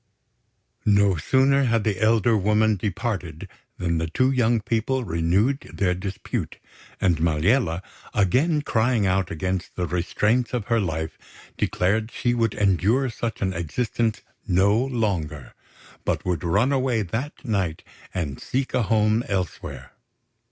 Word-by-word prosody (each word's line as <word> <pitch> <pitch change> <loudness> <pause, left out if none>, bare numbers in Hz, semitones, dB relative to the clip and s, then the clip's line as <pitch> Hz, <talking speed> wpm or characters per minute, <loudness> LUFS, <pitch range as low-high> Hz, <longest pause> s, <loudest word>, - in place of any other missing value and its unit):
No 100 -2 +4
sooner 135 - +3
had 115 -3 +2
the 105 -2 -1
elder 110 +1 +4
woman 105 +1 +3
departed 95 -4 -3 0.3
than 85 -2 0
the 80 - -1
two 130 +10 +2
young 120 -3 +2
people 115 +4 -1
renewed 95 +9 +1
their 90 -3 +1
dispute; 95 +2 -4 0.4
and 90 -4 +2
Maliella, 85 - +1 0.3
again 145 - +2
crying 115 -3 +1
out 95 -1 +1
against 95 +2 -3
the 90 - -1
restraints 105 +8 0
of 115 -4 -2
her 115 -1 +3
life, 80 -4 -3 0.4
declared 105 +5 0
she 120 0 -1
would 115 -3 0
endure 105 +7 +2
such 115 -1 -4
an 95 -1 0
existence 110 +7 -1 0.3
no 95 +3 +3
longer, 95 - -2 0.5
but - - -1
would 90 -1 -1
run 100 +10 +2
away 130 -5 +1
that 115 - -3
night 95 -8 -1 0.3
and 75 -7 -4
seek 135 +1 -2
a 125 - +2
home 110 +1 +2
elsewhere. 95 -3 -4
105 Hz, 135 wpm, -24 LUFS, 90-120 Hz, 0.5 s, No